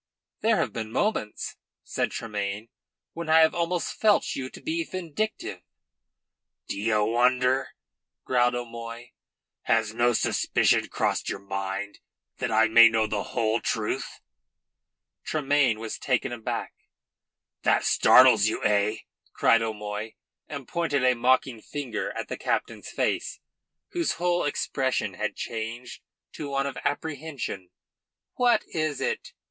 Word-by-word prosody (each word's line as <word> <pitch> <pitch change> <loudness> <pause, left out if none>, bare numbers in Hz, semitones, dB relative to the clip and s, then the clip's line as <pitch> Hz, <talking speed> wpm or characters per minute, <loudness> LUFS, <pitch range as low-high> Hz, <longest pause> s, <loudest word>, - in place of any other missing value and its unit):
"There 220 0 +3
have - - -1
been 110 -1 -4
moments," 115 - -1 0.3
said - - -1
Tremayne, 105 0 -4 0.4
"when 165 -1 -6
I 160 +1 +7
have 160 - +5
almost 175 0 -1
felt 215 -2 +2
you 130 -1 -4
to - - -12
be 330 +1 -2
vindictive." 185 - -4 1.1
"D'ye 110 +2 0
wonder?" 125 +4 +2 0.5
growled 125 -1 +2
O'Moy. 115 0 -7 0.5
"Has 110 -1 +2
no 120 +1 +3
suspicion - - +2
crossed - - -1
your - - -2
mind 95 +1 -4 0.4
that - - -2
I 110 +1 +4
may 115 +1 +8
know 110 -1 +2
the 105 -1 -2
whole 110 0 0
truth?" - - -2 1.0
Tremayne 145 -6 +2
was 110 -1 -5
taken 125 -1 0
aback. 120 -2 -4 0.9
"That - - +2
startles 125 -5 +6
you, 110 - -2
eh?" 105 +1 +2 0.3
cried 115 - +4
O'Moy, 105 0 -4 0.3
and 140 -4 -7
pointed 160 -6 0
a 130 0 +5
mocking 125 -1 +1
finger 135 -6 -4
at - - -4
the - - -5
captain's - - -2
face, - - -1 0.5
whose 345 -2 0
whole 175 0 0
expression 135 -2 -1
had 105 -2 -3
changed 115 +2 -5 0.3
to 145 - -6
one 140 0 0
of 140 -2 -4
apprehension. 145 - -4 0.6
"What 245 -1 +3
is 155 -3 -2
it?" - - -3
120 Hz, 130 wpm, -26 LUFS, 110-145 Hz, 1.1 s, may